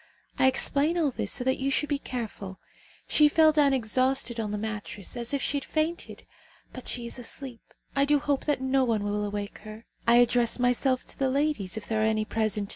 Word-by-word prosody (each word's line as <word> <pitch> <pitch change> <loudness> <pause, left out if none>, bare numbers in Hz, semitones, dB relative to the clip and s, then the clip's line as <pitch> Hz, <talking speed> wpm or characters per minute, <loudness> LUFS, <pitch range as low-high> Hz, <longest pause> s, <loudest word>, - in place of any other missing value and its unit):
I 265 - +5
explain 285 +5 +2
all 310 -5 +2
this - - -3
so 250 - -1
that 260 +1 0
you 270 +1 0
should 290 +2 0
be 285 -2 0
careful. 215 -8 -6 0.5
She 300 -1 +5
fell 315 +1 +5
down 295 -2 +3
exhausted 255 0 +1
on 215 -2 -2
the 210 - -3
mattress 210 -2 -5
as 235 -1 -4
if 280 -2 -1
she 285 - 0
had 280 - -4
fainted. 320 +2 -3 0.5
But 255 - -9
she 240 -1 0
is 235 - -2
asleep. 245 0 -7 0.3
I 275 0 +3
do 295 +1 +3
hope 285 -1 -1
that 295 -3 0
no 265 0 +2
one 225 -4 0
will 205 0 -1
awake 205 0 -5
her. 215 +1 -11 0.2
I 235 - +6
address 240 -1 +3
myself 250 +1 +1
to - - -10
the 270 -1 +2
ladies, 270 -8 -1
if 220 - -5
there 220 -1 0
are - - +2
any 215 -1 +1
present. 215 -2 -1
250 Hz, 215 wpm, -27 LUFS, 220-280 Hz, 0.5 s, I